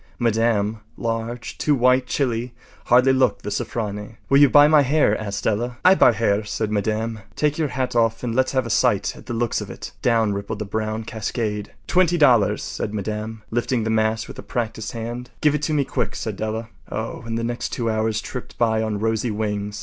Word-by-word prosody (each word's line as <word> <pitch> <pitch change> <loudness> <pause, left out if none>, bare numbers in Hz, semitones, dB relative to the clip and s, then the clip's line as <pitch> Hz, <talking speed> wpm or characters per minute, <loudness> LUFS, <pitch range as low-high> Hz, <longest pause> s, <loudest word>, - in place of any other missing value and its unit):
Madame, 115 -2 +1 0.2
large, 115 +1 -4
too 150 - +2
white, 125 0 +3
chilly, 120 -3 -1 0.3
hardly 125 +2 +5
looked 130 -1 +2
the 105 - -4
“Sofronie.” 105 -1 -4
“Will 140 - +6
you 145 -1 +7
buy 145 +2 +7
my 155 -1 +6
hair?” 140 -5 +3
asked 100 -2 -4
Della. 120 +3 -1
“I 185 - +9
buy 130 - +6
hair,” 105 -1 +1
said 105 +1 -3
Madame. 110 +2 -1 0.2
“Take 150 +1 0
yer 155 - +2
hat 130 -2 -3
off 115 0 +2
and 120 -2 -2
let’s 130 +3 +1
have 130 -2 +1
a 115 - -3
sight 105 -3 +2
at - - -14
the 120 - -3
looks 120 0 0
of - - -7
it.” - - -8
Down 115 -3 +2
rippled 100 +2 -4
the 105 - -4
brown 110 +2 -3
cascade. 105 -1 -3
“Twenty 175 -1 +3
dollars,” 125 -10 +4
said 105 - -4
Madame, 110 +2 -4
lifting 120 0 0
the 110 - -1
mass 110 0 +1
with - - -10
a - - -4
practised 110 -2 -4
hand. 120 +2 -5
“Give 150 -2 +3
it 150 - -1
to 155 +1 -1
me 140 -2 +2
quick,” - - -2
said - - -4
Della. 110 +1 -4 0.2
Oh, 110 +2 -4
and 115 0 -2
the 115 - -2
next 120 +1 -2
two 120 - -3
hours 110 -1 0
tripped 125 +2 -8
by 110 -2 +2
on 110 -2 -1
rosy 110 +2 0
wings. 105 -1 -3
115 Hz, 210 wpm, -22 LUFS, 110-125 Hz, 0.3 s, I